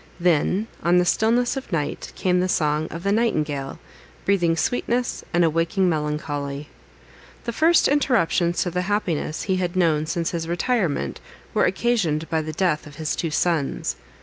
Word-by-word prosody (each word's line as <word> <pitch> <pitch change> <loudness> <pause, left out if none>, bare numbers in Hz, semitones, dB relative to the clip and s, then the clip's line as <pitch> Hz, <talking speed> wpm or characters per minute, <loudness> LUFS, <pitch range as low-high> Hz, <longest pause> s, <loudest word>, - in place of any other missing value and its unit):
Then, 180 +4 +2 0.2
on 175 +1 +3
the 180 - +4
stillness 235 +6 +2
of 265 -5 -6
night, 150 -4 -2
came 180 -1 +1
the 185 +1 0
song 150 -1 +1
of 165 +1 -7
the 200 - +1
nightingale, 150 -11 0 0.5
breathing 175 -4 +2
sweetness, 245 +4 -1
and 175 0 +3
awakening 165 +4 +1
melancholy. 150 -2 -3 0.7
The 235 - -3
first 325 +6 +4
interruptions 210 - +2
to 175 - -3
the 180 +1 -1
happiness 175 -7 -1
he 190 -2 0
had 180 -1 -2
known 160 -4 +2
since 165 0 -1
his 165 -2 -3
retirement, 175 - 0 0.3
were - - +3
occasioned 185 -7 0
by 160 -1 +2
the 155 0 -5
death 155 -2 0
of 145 - -12
his 155 -2 -2
two 165 - -2
sons. 155 -2 0
170 Hz, 160 wpm, -23 LUFS, 155-200 Hz, 0.7 s, the